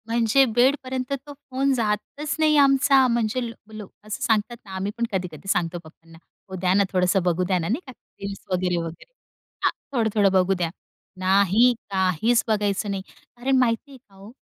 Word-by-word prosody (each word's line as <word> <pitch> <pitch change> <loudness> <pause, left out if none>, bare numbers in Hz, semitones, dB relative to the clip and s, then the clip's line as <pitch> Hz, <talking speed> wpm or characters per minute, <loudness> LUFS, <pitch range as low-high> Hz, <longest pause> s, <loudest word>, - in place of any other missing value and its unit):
म्हणजे 230 +3 +3
बेडपर्यंत 260 +1 +1
तो 290 - -9
फोन 275 -1 -1
जातच 245 +6 -2
नाही 310 -1 +4
आमचा. 275 -1 +5
म्हणजे 235 0 0
लो - - -8 0.2
लोकं 210 0 -12
असं 215 - -5
सांगतात 230 0 0
ना, 195 - -12
आम्ही 190 +2 -2
पण 235 - 0
कधी-कधी 180 -2 -5
सांगतो 175 0 -1
पप्पांना, 165 +1 -17 0.3
"ओ 190 - -6
द्या 180 0 +2
ना, 200 +1 +4
थोडंसं 180 0 +2
बघू 180 0 +1
द्या 185 +1 +1
ना," 165 - -3
नाही 240 +8 0
का. - - -8 0.3
रील्स 200 0 -5
वगैरे, 180 -1 0
वगैरे. 165 - -6 0.5
हां, - - +4 0.2
थोडं, 235 -5 +1
थोडं 200 -2 +4
बघू 190 0 +3
द्या. 175 -2 -1 0.5
नाही, 200 +6 +4 0.2
काहीच 190 +5 +2
बघायचं 205 -2 0
नाही. 195 -1 -3 0.3
अरे, 255 +3 -2
माहिती 255 +1 +1
आहे 270 - -12
का 210 -6 -26
हो? 195 +3 -13
210 Hz, 185 wpm, -24 LUFS, 185-255 Hz, 0.5 s, आमचा